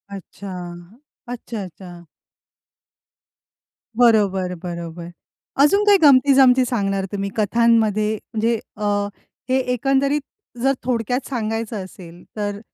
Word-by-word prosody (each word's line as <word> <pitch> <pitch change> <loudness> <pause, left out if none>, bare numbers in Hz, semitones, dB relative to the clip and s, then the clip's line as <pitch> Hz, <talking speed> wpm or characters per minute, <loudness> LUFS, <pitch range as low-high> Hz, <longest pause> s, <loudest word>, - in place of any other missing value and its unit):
अच्छा. 195 +1 -10 0.8
अच्छा-अच्छा. 185 -7 -8 1.9
बरोबर, 200 -6 +3
बरोबर. 170 -1 -6 0.5
अजून 400 +8 +4
काही 405 -1 +6
गमती-जमती 265 -2 +6
सांगणार 195 -5 -1
तुम्ही 200 -1 -3
कथांमध्ये? 215 -1 +2 0.2
म्हणजे 225 +1 +1 0.2
अ, 210 - -7 0.7
हे 260 - +3 0.2
एकंदरीत 275 +3 +1 0.4
जर 270 +1 +3
थोडक्यात 245 +1 -1
सांगायचं 225 -4 -3
असेल 175 -2 -13
तर, 205 -1 -3
220 Hz, 90 wpm, -21 LUFS, 195-250 Hz, 1.9 s, काही